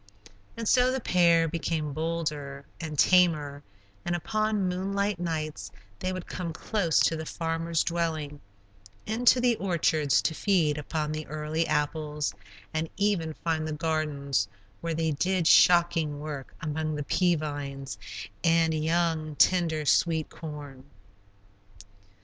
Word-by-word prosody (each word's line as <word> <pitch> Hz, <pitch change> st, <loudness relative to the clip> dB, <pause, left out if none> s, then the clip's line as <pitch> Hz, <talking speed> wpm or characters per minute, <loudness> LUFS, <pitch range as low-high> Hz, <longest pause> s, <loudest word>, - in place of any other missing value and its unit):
And 230 Hz, -1 st, -3 dB
so 250 Hz, +2 st, +4 dB
the 265 Hz, -, -1 dB
pair 170 Hz, -6 st, +4 dB
became 155 Hz, -2 st, -2 dB
bolder 150 Hz, -3 st, -3 dB
and 155 Hz, -3 st, -5 dB
tamer, 155 Hz, -5 st, +3 dB, 0.4 s
and 175 Hz, -, -1 dB
upon 215 Hz, +2 st, 0 dB
moonlight 195 Hz, +2 st, -1 dB
nights 155 Hz, -, -3 dB, 0.3 s
they 185 Hz, -, -2 dB
would 185 Hz, -1 st, -5 dB
come 170 Hz, -3 st, -5 dB
close 170 Hz, -1 st, 0 dB
to 165 Hz, -, +3 dB
the 160 Hz, -, -4 dB
farmer's 165 Hz, 0 st, -1 dB
dwelling; 160 Hz, -4 st, -2 dB, 0.6 s
into 240 Hz, +3 st, +3 dB
the 245 Hz, -1 st, +3 dB
orchards 160 Hz, -6 st, +2 dB
to 160 Hz, -, +1 dB
feed 160 Hz, -5 st, +1 dB
upon 150 Hz, +1 st, -3 dB
the 155 Hz, 0 st, -5 dB
early 155 Hz, +2 st, -2 dB
apples, 150 Hz, -1 st, -1 dB, 0.4 s
and 155 Hz, +1 st, -2 dB
even 190 Hz, -6 st, 0 dB
find 160 Hz, -1 st, 0 dB
the 155 Hz, -, -3 dB
gardens, 150 Hz, -, -1 dB, 0.3 s
where 165 Hz, -1 st, -2 dB
they 160 Hz, 0 st, 0 dB
did 180 Hz, +4 st, 0 dB
shocking 165 Hz, -4 st, +5 dB
work 145 Hz, -3 st, -7 dB
among 155 Hz, 0 st, -2 dB
the 150 Hz, -, -3 dB
pea 175 Hz, +4 st, +2 dB
vines 145 Hz, -3 st, -5 dB, 0.4 s
and 165 Hz, -1 st, +3 dB
young, 160 Hz, -1 st, 0 dB
tender, 165 Hz, -3 st, +3 dB
sweet 160 Hz, +2 st, +2 dB
corn. 145 Hz, -4 st, -8 dB
160 Hz, 130 wpm, -28 LUFS, 150-175 Hz, 0.6 s, shocking